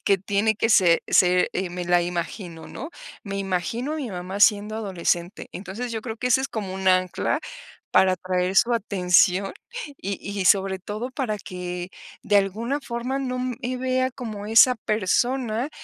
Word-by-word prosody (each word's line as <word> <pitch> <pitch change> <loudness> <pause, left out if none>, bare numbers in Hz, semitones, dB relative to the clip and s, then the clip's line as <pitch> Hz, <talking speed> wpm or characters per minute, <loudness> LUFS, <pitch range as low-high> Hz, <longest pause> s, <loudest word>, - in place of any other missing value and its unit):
que 200 - +4
tiene 200 +3 +1
que 225 +2 0
se 180 -6 +5
ser, 180 0 +4
eh, 185 0 -2
me 180 0 -4
la 175 0 +3
imagino, 175 0 -5
¿no?, - - -7 0.4
me 200 -1 -4
imagino 195 - -2
a - - -2
mi 275 -7 -4
mamá 185 +2 -5
siendo 210 0 +4
adolescente". 180 -2 -2
Entonces, 210 +6 -6
yo 220 - -3
creo 220 0 -6
que 250 +2 -2
ese 250 - +4
es 270 - -2
como 205 -6 -4
un 190 0 0
ancla 185 -1 +2 0.5
para 190 0 +5
atraer 185 0 -1
su 240 +3 +5
atención 190 -2 +2 0.4
y 200 -4 -4
y 200 -1 -4
sobre 190 0 +3
todo 215 +6 -5
para 250 -6 -2
que 180 -2 -6 0.3
de 205 - +3
alguna 220 +8 0
forma 245 +1 -3
no 255 -2 -3
me 255 0 -3
vea 255 0 0
como 220 -5 -7
esa 225 +4 +6
persona 230 - 0
205 Hz, 170 wpm, -24 LUFS, 185-235 Hz, 0.5 s, esa